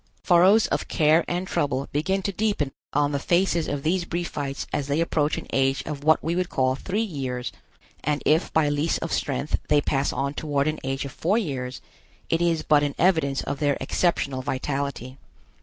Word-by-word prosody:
Furrows 190 +5 +5
of - - -1
care 155 +2 +3
and 175 +1 -2
trouble 140 -5 -1
begin 190 +7 0
to 200 - -1
deepen 200 -8 -1 0.2
on 145 0 +1
the 140 - -1
faces 170 +1 +1
of 145 -1 -3
these 175 +3 +1
Briefites 165 -5 -3
as 140 - -1
they 145 +2 0
approach 155 -2 +1
an - - -6
age 135 0 +2
of 145 -2 -5
what 155 +1 +4
we 165 +1 -1
would 180 0 -1
call 130 -1 +1
three 195 +11 -2
years, 130 - -4 0.5
and 150 +1 -1
if 155 +2 +3
by 160 -2 +3
lease 145 +3 +1
of 165 - -4
strength 140 +1 -1
they 150 - +5
pass 140 -1 0
on 140 +1 -2
toward 145 -2 -1
an 155 0 -1
age 135 +1 -2
of 140 - -6
four 190 +10 0
years, 130 - -3 0.5
it 165 - +2
is 170 -2 +1
but 150 -1 +4
an 145 -1 -1
evidence 160 -7 +2
of 140 - -4
their 145 -2 +1
exceptional 140 -7 0
vitality. 135 -1 -3
150 Hz, 190 wpm, -25 LUFS, 140-170 Hz, 0.5 s, Furrows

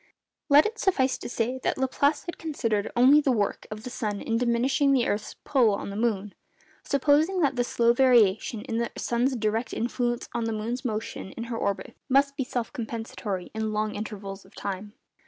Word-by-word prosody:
Let 290 +1 +7
it 445 +1 -3
suffice 270 -9 +1
to - - -6
say 245 +2 -1
that - - 0
Laplace 280 +3 +1
had 345 - -6
considered 230 -10 -1
only 265 +5 +7
the 280 - +2
work 210 -4 -1
of 215 0 -7
the 250 - -6
sun 210 -4 -3
in 225 - -2
diminishing 255 +4 +2
the 250 -3 +3
earth's 210 +1 -2
pull 245 -8 +3
on 200 - -5
the - - -6
moon, 210 -3 -1 0.5
supposing 300 +6 +2
that 275 -4 +2
the 245 - +2
slow 235 -1 +2
variation 230 -4 +3
in 225 - -3
the 235 0 0
sun's 245 +3 0
direct 220 +1 -1
influence 240 0 -1
on 235 - -1
the 225 - -1
moon's 230 +4 -3
motion 215 -5 -4
in 230 - -6
her - - -2
orbit 200 -1 -2
must 275 +1 +3
be 275 - -1
self 245 -2 -4
compensatory 225 -5 -5
in 220 0 -2
long 215 0 -1
intervals 200 -2 -6
of - - -21
time. 200 +1 -5
235 Hz, 195 wpm, -27 LUFS, 215-265 Hz, 0.5 s, Let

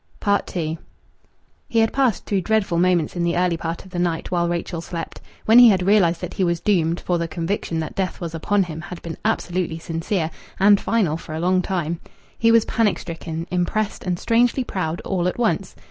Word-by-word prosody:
II 160 -2 -2 0.9
He 235 - -1
had 225 0 +3
passed 265 -5 +1
through 195 -2 0
dreadful 195 -3 +1
moments 175 -3 +2
in 175 - -1
the 170 0 +1
early 180 -1 +2
part 165 +2 -5
of 190 - -14
the 175 - -3
night 175 -1 -1
while 170 -1 +1
Rachel 170 0 -3
slept. 170 0 -6 0.2
When 225 +2 +7
he 245 -1 +10
had 190 -3 +2
realized 190 -4 +3
that 180 -1 -5
he 190 - -1
was 170 -1 +1
doomed 170 -5 +1
for 175 -1 -1
the 170 - -1
conviction 165 0 -2
that 155 - -5
death 190 -1 -2
was 170 -2 -5
upon 195 +5 +1
him 165 -2 -6
had 175 0 -8
been 165 -1 -6
absolutely 180 -6 -1
sincere 165 +1 -2 0.3
and 200 +1 +5
final 190 -9 +1
for 155 -1 -8
a - - -3
long 185 +2 +2
time 170 -3 -2 0.4
he 230 0 +4
was 230 -1 +5
panic 225 -5 +1
stricken, 165 -1 -6
impressed, 190 +4 -1
and 180 -1 -1
strangely 240 +6 +2
proud, 175 -7 -3
all 180 -2 -1
at 180 - -2
once. 220 -5 0
180 Hz, 205 wpm, -22 LUFS, 170-200 Hz, 0.9 s, he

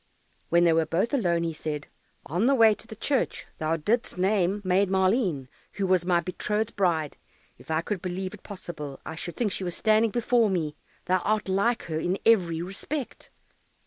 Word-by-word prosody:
When 170 +1 +4
they 170 -1 +5
were 160 0 +2
both 190 - 0
alone, 175 -10 +1
he 165 -1 -2
said, 150 -1 -5 0.4
"On 180 - 0
the 275 - +4
way 225 -3 +6
to 220 +1 -10
church 270 +5 -1
thou 160 +1 0
didst 215 +6 -1
name 190 +1 +2
Maid 185 +1 +3
Maleen, 190 - +1 0.3
who 195 - -1
was 185 -2 +2
my 175 -2 +4
betrothed 210 +5 -2
bride; 165 -6 0 0.4
if - - -17
I 160 0 +1
could 190 +1 -3
believe 185 +1 -4
it - - -11
possible, 155 -8 -8
I - - -5
should 165 +2 -6
think 225 -4 0
she 190 - -2
was 175 -2 -4
standing 220 +1 +3
before 235 0 +2
me 160 -6 -1 0.3
thou 185 0 +2
art 215 +2 0
like 200 +5 +1
her 160 -2 -3
in 180 +4 0
every 175 -7 +3
respect." 245 +9 -5
185 Hz, 185 wpm, -27 LUFS, 170-215 Hz, 0.4 s, way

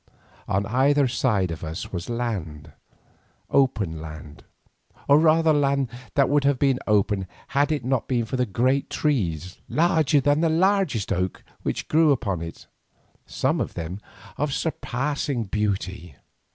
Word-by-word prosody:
On 100 +1 0
either 135 +4 +3
side 110 -7 +1
of 80 - -6
us 80 +3 -6
was 90 +3 -4 1.4
open 105 - +1
land, 75 -1 -10 0.6
or 145 +1 +6
rather 160 0 +4
land 140 -3 +1 0.3
that 140 -1 +4
would 145 0 +2
have 140 -1 +3
been 135 -1 +2
open 100 -2 +1 0.2
had 145 +2 +2
it 145 -6 -2
not 130 -2 0
been 120 -3 0
for 120 - -4
the 125 -1 0
great 130 +7 +1
trees, 90 - -1
larger 160 -4 +3
than 145 +3 +2
the 165 - +3
largest 165 - +1
oak, 90 0 -2 0.2
which - - -3
grew 160 -1 +4
upon 100 -10 -1
it, 85 0 -8 0.6
some - - 0
of - - -4
them 85 +3 -5 0.4
of 145 0 -1
surpassing 140 -4 -2
beauty. 95 -6 -3
125 Hz, 140 wpm, -24 LUFS, 95-145 Hz, 1.4 s, or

